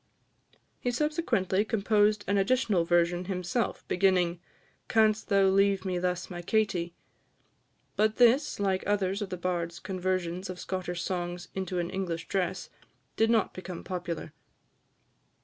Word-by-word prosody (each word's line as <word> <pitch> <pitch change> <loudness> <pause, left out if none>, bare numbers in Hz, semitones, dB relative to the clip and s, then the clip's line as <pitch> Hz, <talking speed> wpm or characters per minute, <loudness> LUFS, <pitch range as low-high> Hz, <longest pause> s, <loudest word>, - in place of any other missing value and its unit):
He 245 - -1
subsequently 245 - +1
composed 210 -1 +2
an 200 0 +2
additional 210 -4 +2
version 175 +1 +2
himself, 185 +5 -2
beginning, 180 -2 +2 0.5
"Canst 220 -1 +2
thou 200 -1 +4
leave 195 0 +3
me 180 -1 -1
thus, 180 0 -1
my 175 -1 -6
Katie?" 175 -3 0 1.0
but 215 +1 +2
this, 245 +2 +4
like 190 -2 0
others 200 0 0
of 205 - -3
the 180 - -4
bard's 175 -1 -2
conversions 185 -1 -2
of 180 -1 -6
Scottish 180 -2 -4
songs 175 -1 -3
into 190 -1 -3
an 175 -1 -2
English 170 -4 -3
dress, 190 -2 -2 0.4
did 225 0 +3
not 225 -3 +2
become 185 -1 -7
popular. 175 -4 -5
190 Hz, 130 wpm, -29 LUFS, 175-205 Hz, 1.0 s, thou